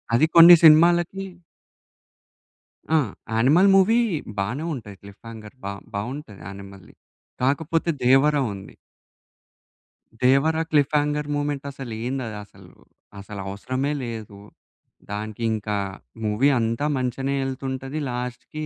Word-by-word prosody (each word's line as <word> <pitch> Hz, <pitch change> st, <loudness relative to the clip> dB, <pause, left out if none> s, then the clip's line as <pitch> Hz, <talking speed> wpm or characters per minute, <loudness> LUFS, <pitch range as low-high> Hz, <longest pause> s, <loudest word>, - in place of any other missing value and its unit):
అది 130 Hz, -, +4 dB
కొన్ని 170 Hz, +1 st, +11 dB
సినిమా‌లకి 170 Hz, +4 st, +5 dB, 1.7 s
ఆ! -, -, +6 dB, 0.3 s
'యానిమల్' 145 Hz, -, +4 dB
మూవీ 195 Hz, +4 st, +4 dB, 0.4 s
బానే 115 Hz, +11 st, -2 dB
ఉంటది 105 Hz, -7 st, -9 dB
క్లిఫ్ 100 Hz, 0 st, -15 dB
హంగర్ 110 Hz, +1 st, -11 dB
బావ్ 100 Hz, 0 st, -6 dB
బావుంటది. 110 Hz, 0 st, -6 dB
'యానిమల్‌ది'. 100 Hz, 0 st, -11 dB, 0.5 s
కాకపోతే 160 Hz, +6 st, 0 dB
'దేవ‌ర' 135 Hz, +4 st, +4 dB
ఉంది. 95 Hz, 0 st, -11 dB, 1.5 s
దేవరా 140 Hz, +5 st, +3 dB
క్లిఫ్‌హ్యంగార్ 150 Hz, 0 st, +1 dB
మూమెంట్ 145 Hz, -1 st, -3 dB
అసలు 135 Hz, -4 st, -8 dB
ఏందది 125 Hz, -4 st, -4 dB
అసలు? -, -, -18 dB, 0.5 s
అసలు 100 Hz, +1 st, -9 dB
అవసరమేలేదు. 120 Hz, -1 st, -4 dB, 0.7 s
దానికి 110 Hz, +2 st, -5 dB
ఇంకా 105 Hz, -1 st, -3 dB, 0.5 s
మూవీ 110 Hz, +6 st, +2 dB
అంతా 115 Hz, +4 st, -1 dB
మంచిగనే 135 Hz, +2 st, -2 dB
ఎళ్తుంటది 135 Hz, +2 st, -5 dB
లాస్ట్‌కి 125 Hz, +5 st, -6 dB
130 Hz, 100 wpm, -23 LUFS, 110-150 Hz, 1.7 s, కొన్ని